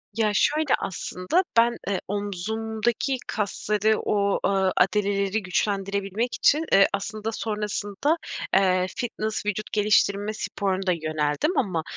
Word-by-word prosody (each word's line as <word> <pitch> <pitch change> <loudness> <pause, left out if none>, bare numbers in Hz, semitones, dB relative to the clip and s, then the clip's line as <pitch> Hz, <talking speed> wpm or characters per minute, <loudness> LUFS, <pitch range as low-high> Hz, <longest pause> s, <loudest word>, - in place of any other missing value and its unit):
Ya, 220 -2 +2
şöyle, 300 +6 +2
aslında 185 - -1
ben, 235 +1 +4
eee, 200 -2 -1
omzumdaki 220 +5 -2
kasları 210 +1 0
o, 200 -1 +1
aaa, 195 -1 +2
adaleleri 200 +1 +1
güçlendirebilmek 200 +4 -1
için, 305 +3 +3
eee, 195 - +7
aslında 215 +2 -3
sonrasında, 210 - -1 0.4
eee, 185 -1 +3
fitness 220 -3 -3
vücut 210 +1 -3
geliştirme 205 0 +2
sporuna 195 -3 -2
da - - +4
yöneldim 155 - -1
ama 180 -9 0
205 Hz, 115 wpm, -25 LUFS, 195-220 Hz, 0.4 s, eee